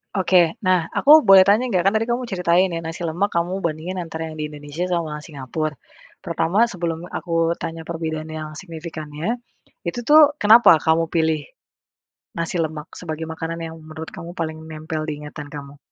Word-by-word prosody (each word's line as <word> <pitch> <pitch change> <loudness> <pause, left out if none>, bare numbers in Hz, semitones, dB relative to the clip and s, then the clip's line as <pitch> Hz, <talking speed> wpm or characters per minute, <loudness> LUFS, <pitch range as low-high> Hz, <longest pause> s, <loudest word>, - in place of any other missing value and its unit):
Oke 185 +1 +3
nah 185 -4 +1
aku 305 +1 +7
boleh 195 -2 +8
tanya 230 +5 +3
gak? 185 -1 +2
Kan 210 - +2
tadi 220 - +2
kamu 245 +1 -2
ceritain 180 -2 +2
ya 165 - -4
nasi 165 +1 -4
lemak 180 +6 -1
kamu 175 +3 -1
bandingin 170 +3 -3
antara 165 -2 -5
yang 155 - -8
di 150 -1 -4
Indonesia 145 +3 -6
sama 155 -4 -2
Singapura, 150 +1 -4 0.5
pertama 210 +8 +1
sebelum 170 -4 -4
aku 165 -1 -1
tanya 165 0 -6
perbedaan 160 -2 -4
yang 155 -1 -6
signifikannya, 165 +3 -5 0.5
itu 240 - -2
tuh 295 +1 +6
kenapa 225 - +7
kamu 165 +1 +2
pilih, 160 -2 +1 0.9
nasi 170 +1 -2
lemak 155 0 -3
sebagai 160 -2 -5
makanan 165 +1 -5
yang 165 0 -6
menurut 155 0 -9
kamu 175 -1 -9
paling 160 -1 -4
nempel 155 0 -5
di 150 -1 -5
ingatan 150 0 -8
kamu? 145 0 -10
165 Hz, 170 wpm, -22 LUFS, 155-185 Hz, 0.9 s, boleh